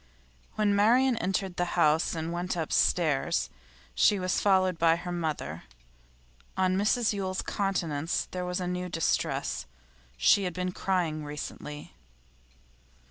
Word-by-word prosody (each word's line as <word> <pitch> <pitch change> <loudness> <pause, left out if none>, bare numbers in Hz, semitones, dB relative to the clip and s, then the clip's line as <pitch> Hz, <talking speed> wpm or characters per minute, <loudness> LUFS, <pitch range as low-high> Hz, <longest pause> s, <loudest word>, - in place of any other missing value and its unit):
When 210 -1 +2
Marian 240 +5 +4
entered 190 -2 -2
the 175 0 -2
house 160 +1 +3
and 165 +1 -3
went 180 +1 -2
upstairs, 150 - +1 0.4
she 205 - +4
was 185 -1 0
followed 185 -3 +3
by 165 0 +5
her 175 +1 -6
mother. 160 -4 -3 0.9
On 185 0 +2
Mrs 215 +3 +2
Yule's 190 -2 -2
countenance 170 -6 -1
there 180 0 -3
was 180 0 -2
a 180 - -2
new 180 0 -3
distress, 165 - -1 0.5
she 195 - +4
had 180 - -3
been 180 0 -2
crying 175 -5 -1
recently. 150 0 -7
180 Hz, 130 wpm, -28 LUFS, 165-190 Hz, 0.9 s, by